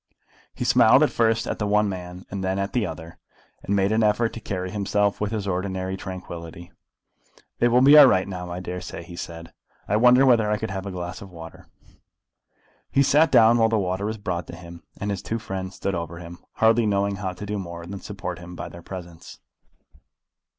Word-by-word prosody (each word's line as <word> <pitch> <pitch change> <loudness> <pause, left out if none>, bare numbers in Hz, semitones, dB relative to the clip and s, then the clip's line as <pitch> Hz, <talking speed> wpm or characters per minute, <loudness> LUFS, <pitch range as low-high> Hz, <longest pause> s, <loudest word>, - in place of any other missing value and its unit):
He - - -3
smiled - - +6
first 115 -1 +1
at - - -4
the 105 - -1
one 105 +1 +3
man 90 -1 -7
and 100 -1 -4
then 95 +1 -1
at 100 0 -2
the 120 -6 +1
other, 80 0 -9 0.4
and 100 - -1
made 100 +1 +2
an 110 +1 +2
effort 110 +2 +2
to - - -6
carry 95 -3 -4
himself 105 0 0
with 105 0 -1
his 105 -3 -3
ordinary 95 0 -2
tranquillity. 85 -3 -8 0.9
"It 120 - +4
will 125 +2 +4
be 140 +2 +8
all 145 - +10
right 95 -5 +2
now, 90 -2 -6
I 90 +1 -5
dare 90 0 -5
say," 90 - -7
he 85 +1 -11
said. 85 -1 -8 0.3
"I 105 - +2
wonder 125 +3 +6
whether 115 -5 +4
I 105 - +1
could 110 -1 -4
have 95 0 -5
a - - -4
glass 90 -1 -6
of 100 - -10
water." 80 -2 -12 1.2
He 140 - +3
sat 150 +4 +4
down 115 +1 +6
while 115 0 +4
the 110 - +1
water 95 +1 -1
was 110 +1 -3
brought 90 -4 -4
to - - -8
him, 85 0 -11 0.2
and 100 +1 -2
his 100 - -3
two 115 - -3
friends 95 -4 -6
stood 100 - -2
over 85 -1 -4
him, 85 0 -10
hardly 110 0 +3
knowing 100 -1 0
how 95 -2 -3
to 105 - -8
do 105 0 -3
more 85 -2 -7
than 95 +2 -7
support 90 -4 -6
him 90 0 -10
by - - -6
their 85 - -11
presence. 85 -2 -10
95 Hz, 215 wpm, -24 LUFS, 90-105 Hz, 1.2 s, all